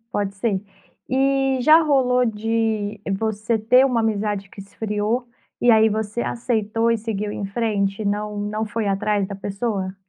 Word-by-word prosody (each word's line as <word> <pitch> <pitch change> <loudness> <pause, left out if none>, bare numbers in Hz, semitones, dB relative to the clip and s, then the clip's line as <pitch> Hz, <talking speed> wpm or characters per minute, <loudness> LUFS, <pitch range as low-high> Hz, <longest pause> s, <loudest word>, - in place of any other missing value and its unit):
pode 200 -1 -2
ser. 195 -2 0 0.5
E 270 0 +2
já 310 +4 +7
rolou 255 -4 +3
de 220 -1 -1 0.2
você 220 +1 -1
ter 250 +5 +5
uma 250 -4 +1
amizade 210 -2 -1
que 195 - -11
esfriou 210 +4 -2 0.3
e 240 - +5
aí 220 0 +6
você 215 +1 -2
aceitou 230 -1 0
e 230 - +2
seguiu 210 -1 -3
em 200 - -4
frente, 205 -1 -1
não 210 +1 -2
não 210 +2 -2
foi 215 0 -3
atrás 200 0 0
da 200 - -7
pessoa? 195 -1 -3
215 Hz, 155 wpm, -22 LUFS, 205-235 Hz, 0.5 s, já